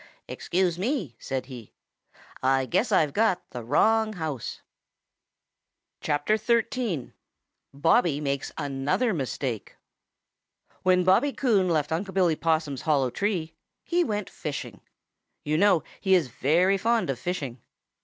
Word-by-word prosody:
"Excuse 180 -1 -1
me," 200 - -2
said 130 -1 -3
he, 125 -5 -11 0.7
"I 135 0 +2
guess 215 - 0
I've 155 -7 +3
got 215 -4 +1
the 120 - -6
wrong 220 - +2
house." 155 - -5 1.4
XIII. 215 - 0 0.6
BOBBY 160 - +2
MAKES 140 -2 -2
ANOTHER 145 - 0
MISTAKE 130 - -4 1.0
|WHEN 185 -1 +3
Bobby 190 +10 +3
Coon 205 -9 +2
left 155 -3 0
Unc' 185 +4 -2
Billy 180 -4 +3
Possum's 155 -4 0
hollow 140 -5 +1
tree, 175 - -2 0.3
he 350 0 +1
went 210 - -2
fishing. 125 -8 -6 0.6
You 155 +1 0
know 195 -4 +4 0.2
he 190 -2 +3
is 165 -8 +1
very 180 +10 +2
fond 230 -6 +1
of 125 - -6
fishing. 140 -9 -4
165 Hz, 120 wpm, -26 LUFS, 140-200 Hz, 1.4 s, know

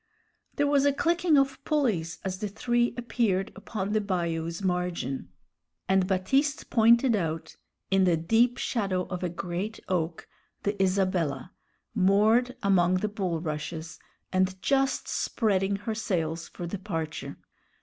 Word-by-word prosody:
There 290 - +2
was 285 -1 +3
a 285 - +3
clicking 335 +1 +2
of 275 -1 +1
pulleys 220 - 0
as 185 -1 -3
the 210 - -2
three 240 +4 0
appeared 225 -5 0
upon 205 -2 -4
the 215 - +2
bayou's 170 -2 -2
margin, 180 - -2 0.6
and 190 -1 +3
Baptiste 270 +10 0
pointed 235 +1 +5
out, 165 -4 -3 0.4
in 195 -1 +4
the 175 -2 +3
deep 230 +9 +3
shadow 195 -6 -1
of 180 -1 -4
a 180 - -1
great 180 +5 -4
oak, 170 -2 -2 0.4
the 205 +1 0
Isabella, 185 -8 0 0.4
moored 220 +6 +3
among 185 -2 +4
the 210 +3 0
bulrushes, 160 -4 -4 0.3
and 185 0 +1
just 270 +4 +1
spreading 200 -4 0
her 205 +3 -3
sails 170 -6 -2
for 175 - -7
departure. 170 -4 -4
190 Hz, 130 wpm, -28 LUFS, 175-230 Hz, 0.6 s, pointed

